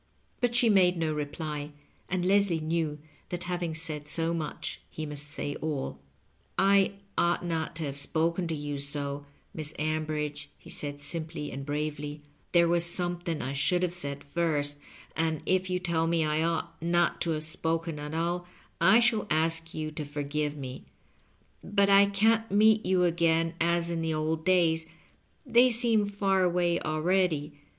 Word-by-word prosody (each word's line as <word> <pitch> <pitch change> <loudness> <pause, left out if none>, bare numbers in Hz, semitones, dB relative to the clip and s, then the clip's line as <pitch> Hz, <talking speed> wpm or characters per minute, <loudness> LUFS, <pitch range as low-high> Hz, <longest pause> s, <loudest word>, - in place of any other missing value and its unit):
But 245 -1 +1
she 240 -1 +5
made 185 -4 +4
no 160 -2 0
reply, 150 0 -4 0.4
and 180 -1 -1
Leslie 195 -3 +3
knew 155 -1 -1 0.3
that 175 0 -3
having 175 -2 -2
said 155 -3 -2
so 165 +2 0
much 160 -3 -4
he 155 - -5
must 150 0 -5
say 145 -1 -4
aU. 145 - -3 0.3
" - - -39
I 195 0 +4 0.3
ought 175 +1 +2
not 165 -1 -2
to 160 - -2
have 140 -2 -3
spoken 165 +5 0
to 165 - -2
you 145 -1 -4
so, 140 0 -4 0.3
Miss 155 -1 -4
Am 155 +1 -1
bridge," 150 -1 -3
he - - -10
said, 145 -1 -3
simply 155 0 -4
and 135 - -5
bravely; 150 0 -3
" - - -38
there 170 -1 +5
was 170 0 +2
some 175 0 -3
thing 170 -3 -3
I 135 - -3
should 175 +6 +2
have 175 -1 0
said 140 -5 -6
first, 145 -2 -1 0.4
and 160 -1 -1
if 185 0 +1
you 180 - +1
tell 170 -2 0
me 165 -1 +2
I 155 +1 +1
ought 165 0 -2
not 170 +1 +1
to 170 - 0
have 155 - -4
spoken 160 0 -2
at 150 +1 -5
all, 175 +2 -1 0.3
I 190 +6 +7
i^hall 235 -3 +3
ask 165 +1 0
you 155 -1 -3
to 155 0 -5
forgive 145 0 -2
me^ 130 -3 -7 0.8
But 200 0 +2
I 200 0 +7
can't 220 +3 +2
meet 215 +2 +5
you 185 -1 +3
again 165 -1 +2
as 170 0 +1
in 165 -1 -1
the 160 -1 -1
old 155 +1 -1
days 165 -3 +3 0.3
— - - -31
^they 245 +1 +6
seem 230 -3 +4
far 195 -1 +1
away 175 -1 +2
already. 155 -1 0
165 Hz, 175 wpm, -29 LUFS, 150-180 Hz, 0.8 s, I